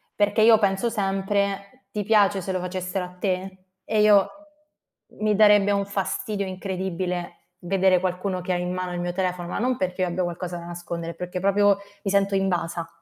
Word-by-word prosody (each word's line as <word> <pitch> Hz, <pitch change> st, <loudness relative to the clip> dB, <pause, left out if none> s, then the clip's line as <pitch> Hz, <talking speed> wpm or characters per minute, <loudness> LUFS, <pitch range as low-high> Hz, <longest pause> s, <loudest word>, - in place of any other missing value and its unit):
perché 205 Hz, +1 st, +2 dB
io 225 Hz, 0 st, +7 dB
penso 200 Hz, +2 st, +1 dB
sempre: 200 Hz, +2 st, -2 dB
"Ti 210 Hz, -1 st, -2 dB
piace 205 Hz, -2 st, +3 dB
se 190 Hz, +2 st, -4 dB
lo 185 Hz, -, -1 dB
facessero 180 Hz, +1 st, -3 dB
a 180 Hz, 0 st, -13 dB
te?" 185 Hz, 0 st, -3 dB, 0.2 s
E 215 Hz, +2 st, +1 dB
io 205 Hz, -2 st, +6 dB, 0.9 s
mi 215 Hz, -1 st, +2 dB
darebbe 205 Hz, -1 st, +5 dB
un 200 Hz, 0 st, +1 dB
fastidio 200 Hz, 0 st, -2 dB
incredibile 185 Hz, -1 st, -4 dB, 0.2 s
vedere 185 Hz, 0 st, +2 dB
qualcuno 185 Hz, +1 st, -2 dB
che 185 Hz, +1 st, -3 dB
ha -, -, 0 dB
in 180 Hz, 0 st, -2 dB
mano 185 Hz, -1 st, -3 dB
il 175 Hz, -, -3 dB
mio 175 Hz, 0 st, -2 dB
telefono, 180 Hz, -2 st, -2 dB
ma 175 Hz, -, -3 dB
non 250 Hz, +2 st, 0 dB
perché 185 Hz, 0 st, -2 dB
io 180 Hz, -, +2 dB
abbia 175 Hz, +1 st, -1 dB
qualcosa 175 Hz, 0 st, -4 dB
da 170 Hz, -, -9 dB
nascondere, 170 Hz, -1 st, -6 dB
perché 180 Hz, +1 st, -5 dB
proprio 200 Hz, +1 st, +3 dB, 0.3 s
mi 195 Hz, -, -1 dB
sento 200 Hz, 0 st, +2 dB
invasa. 175 Hz, -3 st, -1 dB
190 Hz, 185 wpm, -24 LUFS, 180-200 Hz, 0.9 s, io